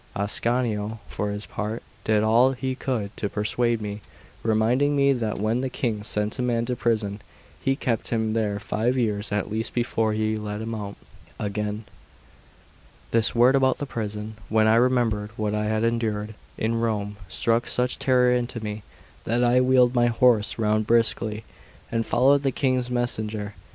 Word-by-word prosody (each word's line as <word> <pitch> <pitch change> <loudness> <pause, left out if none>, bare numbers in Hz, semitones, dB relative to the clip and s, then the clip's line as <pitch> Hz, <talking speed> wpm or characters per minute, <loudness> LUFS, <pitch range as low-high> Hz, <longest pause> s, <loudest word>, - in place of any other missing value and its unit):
Ascanio, 110 +1 0
for 105 - -3
his 105 +1 -4
part, 110 +2 -4 0.2
did 110 -1 +3
all 120 +4 +4
he 130 0 -3
could 120 -6 -3
to 100 - -2
persuade 115 +3 0
me, 105 0 -5 0.4
reminding 120 +6 +2
me 140 0 +4
that 115 -5 -2
when 110 +4 0
the 130 - -2
King 115 -4 -2
sent 105 +2 -2
a - - +1
man 120 -2 0
to 125 +1 -2
prison, 110 -4 -1 0.4
he 135 - +2
kept 120 -4 -2
him 110 -2 0
there 105 -3 0
five 115 +5 -1
years 105 -4 -1
at 105 0 -1
least 110 +1 -3
before 115 -2 +1
he 110 0 0
let 105 0 -4
him 110 +1 -4
out 100 -2 -5 0.4
again. 105 +1 -3 1.3
This 115 0 +2
word 125 +3 +5
about 130 -1 +3
the 145 - -3
prison, 105 -3 -5
when 110 0 +3
I 110 - +5
remembered 115 -3 +2
what 105 -1 -1
I 105 0 0
had 110 +1 0
endured 110 -2 -1 0.2
in 115 +1 0
Rome, 105 -3 -2
struck 115 +4 0
such 125 0 0
terror 125 -1 +3
into 125 -1 -1
me, 105 -1 -5 0.4
that 120 +2 +1
I 125 +1 +4
wheeled 125 -1 +4
my 120 -1 +3
horse 115 -2 +3
round 110 -1 +1
briskly 115 -1 +1 0.5
and 115 0 -1
followed 135 +3 +4
the 135 -1 +1
King's 130 -1 0
messenger. 110 -4 -2
115 Hz, 170 wpm, -25 LUFS, 105-125 Hz, 1.3 s, word